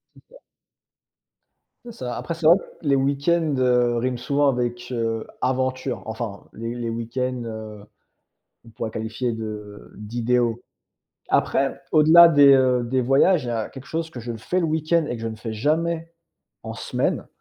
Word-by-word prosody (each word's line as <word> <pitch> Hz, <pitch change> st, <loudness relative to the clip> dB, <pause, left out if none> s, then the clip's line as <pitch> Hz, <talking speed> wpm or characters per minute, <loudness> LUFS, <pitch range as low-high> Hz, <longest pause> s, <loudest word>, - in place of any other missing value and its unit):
Super. -, -, -19 dB, 1.5 s
C'est 235 Hz, -, -8 dB
ça. 125 Hz, -, -6 dB
Après, 170 Hz, -, -4 dB
c'est 165 Hz, -1 st, -6 dB
vrai 170 Hz, -, +9 dB
que -, -, -10 dB, 0.2 s
les 140 Hz, -, +4 dB
week-ends, 140 Hz, +3 st, +1 dB
heu, 125 Hz, -2 st, +2 dB
riment 125 Hz, +1 st, -1 dB
souvent 140 Hz, +4 st, +1 dB
avec, 120 Hz, -2 st, -1 dB
heu, 115 Hz, -2 st, -2 dB
aventure. 130 Hz, 0 st, -1 dB
Enfin, 110 Hz, -2 st, -6 dB
les 115 Hz, +2 st, -5 dB
les 120 Hz, -1 st, -3 dB
week-ends, 120 Hz, +2 st, -3 dB
heu, 110 Hz, -2 st, -8 dB, 0.8 s
qu'on 115 Hz, -, -17 dB
pourrait 110 Hz, 0 st, -5 dB
qualifier 115 Hz, +3 st, -3 dB
de 105 Hz, -2 st, -8 dB
d'idéaux. 120 Hz, +2 st, -1 dB, 0.7 s
Après, 135 Hz, 0 st, +1 dB
au-delà 160 Hz, +2 st, +8 dB
des, 145 Hz, -4 st, +7 dB
heu, 130 Hz, -2 st, +3 dB
des 125 Hz, +2 st, 0 dB
voyages, 135 Hz, +5 st, +3 dB
il -, -, -5 dB
y -, -, -1 dB
a 115 Hz, -2 st, -2 dB
quelque 135 Hz, 0 st, -12 dB
chose 160 Hz, 0 st, -3 dB
que 125 Hz, -, -9 dB
je 120 Hz, 0 st, -5 dB
le 115 Hz, -, -8 dB
fais 180 Hz, +11 st, -2 dB
le 170 Hz, -, +1 dB
week-end 160 Hz, +1 st, +1 dB
et -, -, -2 dB
que 115 Hz, -, -7 dB
je 115 Hz, -, -2 dB
ne 110 Hz, -, -7 dB
fais 110 Hz, 0 st, -6 dB
jamais 165 Hz, +7 st, -1 dB, 0.5 s
en -, -, -6 dB
semaine, -, -, -2 dB
125 Hz, 170 wpm, -23 LUFS, 115-145 Hz, 1.5 s, vrai